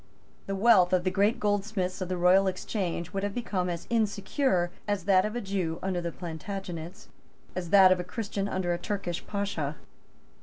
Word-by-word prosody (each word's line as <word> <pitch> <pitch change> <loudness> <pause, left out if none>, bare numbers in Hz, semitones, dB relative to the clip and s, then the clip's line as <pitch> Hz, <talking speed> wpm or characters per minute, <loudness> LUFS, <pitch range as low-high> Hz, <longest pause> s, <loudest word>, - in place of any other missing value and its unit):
The 195 - -2
wealth 195 -4 +5
of 180 -1 +3
the 185 - +1
great 205 +4 +2
goldsmiths 205 -2 -1
of 185 - -3
the 185 - -1
Royal 185 +2 +5
Exchange 185 -2 -3
would 195 - -1
have 200 0 -3
become 195 -7 -1
as 170 -1 -4
insecure 205 -3 +1 0.2
as 205 -3 -1
that 190 0 +4
of 215 +2 -3
a 240 - -2
Jew 190 -5 -2
under 185 -2 -1
the 170 0 -3
Plantagenets, 175 0 -7 0.5
as 180 -2 -4
that 190 -1 +7
of 185 - +3
a - - -2
Christian 200 +1 -3
under 185 -3 -1
a 175 - -3
Turkish 195 -4 -3
Pasha. 195 -8 -2
190 Hz, 185 wpm, -28 LUFS, 175-200 Hz, 0.5 s, that